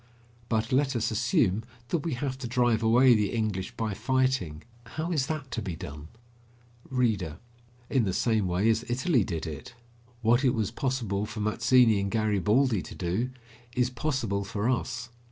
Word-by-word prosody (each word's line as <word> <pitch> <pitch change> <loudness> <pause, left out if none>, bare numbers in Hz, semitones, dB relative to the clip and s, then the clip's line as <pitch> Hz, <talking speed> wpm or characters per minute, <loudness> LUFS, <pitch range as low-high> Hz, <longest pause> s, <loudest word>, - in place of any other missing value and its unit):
But 110 +2 0
let 135 0 +2
us 115 0 0
assume 110 -3 +2 0.3
that 170 - +1
we 155 -2 -2
have 130 0 -2
to 130 - -4
drive 120 -2 +2
away 120 +3 +6
the 105 -3 +2
English 105 -5 -2
by 110 -2 -1
fighting; 125 - 0 0.3
how 160 +3 -1
is 140 -6 +1
that 150 -4 -4
to 115 - -2
be 95 -5 -4
done? 75 0 -8 0.8
READER: 105 - 0 0.5
In 130 -4 +2
the 95 - 0
same 110 0 +1
way 90 +4 +1
as 115 +1 0
Italy 130 - +2
did 85 -3 -4
it. 80 +8 -7 0.5
What 120 +4 +4
it 130 -1 +3
was 110 -4 -1
possible 115 -7 -1
for 105 - -7
Mazzini 115 +1 +4
and 100 0 -1
Garibaldi 110 +2 +2
to - - -9
do, 95 +8 -1 0.5
is 125 0 +1
possible 115 -6 -1
for 105 +1 -2
us. 125 -1 -1
115 Hz, 170 wpm, -28 LUFS, 100-130 Hz, 0.8 s, away